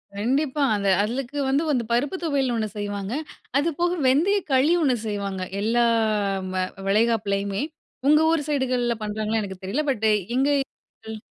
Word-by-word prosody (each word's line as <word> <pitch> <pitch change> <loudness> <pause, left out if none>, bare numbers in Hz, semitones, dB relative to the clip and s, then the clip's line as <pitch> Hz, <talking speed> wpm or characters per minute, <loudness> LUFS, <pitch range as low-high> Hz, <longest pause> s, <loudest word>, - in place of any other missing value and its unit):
கண்டிப்பா, 270 +7 0
அந்த 200 -1 0
அதுக்கு 255 +5 -3
வந்து, 280 +4 +2
வந்து 250 -4 +1
பருப்பு 270 +9 +1
தொவயல்னு 270 -6 0
ஒன்னு 215 -1 -1
செய்வாங்க. 205 +1 -4 0.4
அது 310 +4 +2
போக 350 0 +2 0.2
வெந்தய 340 +11 +3
களி 265 +5 +4
ஒன்னு 265 -5 +3
செய்வாங்க. 200 -2 -3 0.2
எல்லா 235 +3 +2 0.7
ம - - -4 0.3
வளைகாப்புலயுமே. 200 -2 +1 0.5
உங்க 300 +1 +6
ஊர் 305 -3 0
சைடுகள்ல 250 -4 0
பண்றாங்கன்னு 215 +1 -1
எனக்கு 190 -2 -8
தெரியல 255 +11 -1
பட் 220 -3 -2 0.3
இங்க 275 +2 +3 0.6
கள் 220 0 -5
240 Hz, 145 wpm, -24 LUFS, 205-280 Hz, 0.7 s, உங்க